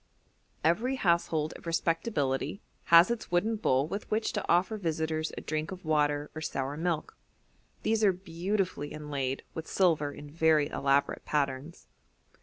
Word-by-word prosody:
Every 225 Hz, -, +2 dB
household 170 Hz, -7 st, +1 dB
of -, -, -11 dB
respectability 165 Hz, -, 0 dB, 0.3 s
has 170 Hz, +6 st, +7 dB
its 235 Hz, -, -3 dB
wooden 195 Hz, +6 st, +1 dB
bowl 135 Hz, -8 st, +2 dB
with 200 Hz, +5 st, -5 dB
which 220 Hz, +1 st, 0 dB
to -, -, -1 dB
offer 180 Hz, +5 st, +3 dB
visitors 160 Hz, -4 st, -1 dB
a -, -, -4 dB
drink 155 Hz, +2 st, -3 dB
of 185 Hz, -2 st, -8 dB
water 150 Hz, -1 st, +1 dB
or 155 Hz, -, -6 dB
sour 135 Hz, -2 st, -3 dB
milk; 165 Hz, 0 st, -2 dB, 0.7 s
these 220 Hz, 0 st, +1 dB
are 200 Hz, -, +6 dB
beautifully 180 Hz, -3 st, -2 dB
inlaid 140 Hz, -3 st, -3 dB
with 160 Hz, -1 st, -6 dB
silver 160 Hz, -6 st, +2 dB
in 145 Hz, +1 st, -10 dB
very 160 Hz, -2 st, +3 dB
elaborate 140 Hz, 0 st, +1 dB
patterns. 145 Hz, +2 st, -2 dB
160 Hz, 145 wpm, -30 LUFS, 145-180 Hz, 0.7 s, has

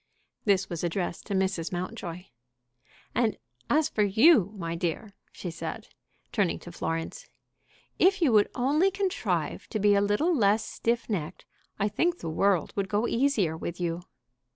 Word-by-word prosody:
This 195 Hz, -2 st, +3 dB
was 170 Hz, -1 st, -5 dB
addressed 175 Hz, 0 st, -2 dB
to 200 Hz, -, -1 dB
Mrs. 190 Hz, -3 st, 0 dB
Mountjoy. 175 Hz, -1 st, -5 dB, 0.9 s
"And 230 Hz, -3 st, +1 dB, 0.3 s
as 310 Hz, +1 st, +3 dB
for 215 Hz, -, -1 dB
you, 210 Hz, -, +5 dB
my 165 Hz, -3 st, -3 dB
dear," 175 Hz, +5 st, -3 dB, 0.2 s
she 175 Hz, -, -6 dB
said, 165 Hz, -, -6 dB, 0.4 s
turning 200 Hz, -6 st, +1 dB
to 175 Hz, -, -9 dB
Florence, 165 Hz, -, -4 dB, 0.7 s
"if 390 Hz, +2 st, +4 dB
you 320 Hz, -8 st, +3 dB
would 210 Hz, -2 st, +5 dB
only 295 Hz, +9 st, +3 dB
contrive 385 Hz, 0 st, -2 dB
to 220 Hz, -, -3 dB
be 205 Hz, 0 st, +4 dB
a 200 Hz, -, +4 dB
little 245 Hz, -, +2 dB
less 210 Hz, -3 st, +3 dB
stiff 235 Hz, 0 st, -1 dB
necked, 180 Hz, -5 st, -4 dB, 0.3 s
I 205 Hz, -, +1 dB
think 340 Hz, -, +1 dB
the 165 Hz, -, -5 dB
world 195 Hz, +1 st, +1 dB
would 195 Hz, -1 st, -1 dB
go 210 Hz, +4 st, +1 dB
easier 230 Hz, -, +1 dB
with 170 Hz, +2 st, -5 dB
you." 170 Hz, 0 st, -2 dB
200 Hz, 155 wpm, -28 LUFS, 175-245 Hz, 0.9 s, you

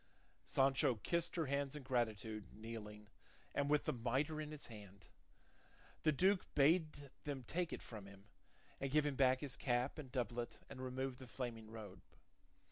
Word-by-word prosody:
Sancho 135 Hz, -2 st, +4 dB
kissed 170 Hz, -, 0 dB
her 165 Hz, -3 st, +1 dB
hands 140 Hz, 0 st, 0 dB
in 150 Hz, -, -6 dB
gratitude, 110 Hz, -4 st, 0 dB
kneeling, 105 Hz, -1 st, -7 dB, 0.5 s
and 140 Hz, 0 st, +1 dB
with 150 Hz, 0 st, +4 dB
the -, -, +1 dB
mitre 130 Hz, +6 st, 0 dB
in 150 Hz, -, -4 dB
his 150 Hz, -1 st, -5 dB
hand. 100 Hz, -4 st, -11 dB, 0.9 s
The 155 Hz, -, +5 dB
duke 185 Hz, +6 st, +4 dB
bade 150 Hz, -1 st, +4 dB
them 140 Hz, -3 st, -3 dB
take 170 Hz, +7 st, -1 dB
it -, -, -4 dB
from 105 Hz, -4 st, -8 dB
him, 100 Hz, 0 st, -13 dB, 0.5 s
and 135 Hz, -, -1 dB
give 150 Hz, +2 st, +4 dB
him 145 Hz, -2 st, +1 dB
back 130 Hz, -1 st, +5 dB
his 145 Hz, -3 st, -3 dB
cap 125 Hz, +3 st, +1 dB
and 135 Hz, -4 st, -7 dB
doublet 120 Hz, -2 st, -2 dB
and 130 Hz, -, -6 dB
remove 130 Hz, 0 st, -2 dB
the 130 Hz, -, -9 dB
flaming 115 Hz, -3 st, -4 dB
robe. 110 Hz, -4 st, -8 dB
130 Hz, 165 wpm, -40 LUFS, 115-145 Hz, 0.9 s, The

